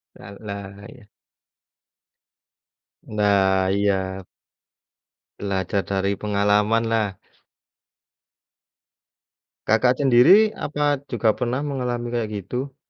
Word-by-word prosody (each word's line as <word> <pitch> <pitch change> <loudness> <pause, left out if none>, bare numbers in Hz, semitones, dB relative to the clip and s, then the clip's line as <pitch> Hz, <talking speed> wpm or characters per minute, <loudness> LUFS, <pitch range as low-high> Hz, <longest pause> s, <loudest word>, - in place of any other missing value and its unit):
La 95 - -12
lah, 100 -1 -8
iya. 125 -7 -16 1.9
Nah, 95 -3 +1
iya. 95 -2 -1 1.2
Belajar 100 0 -2
dari 100 0 -1
pengalaman 105 +2 +1
lah. 110 -4 -1 2.5
Kakak 125 +3 +3
sendiri, 145 - +5
apa 145 -1 -1
juga 115 -3 +1
pernah 125 +4 -3
mengalami 125 -4 -3
kayak 115 -2 -2
gitu? 125 +8 -5
105 Hz, 80 wpm, -22 LUFS, 100-125 Hz, 2.5 s, sendiri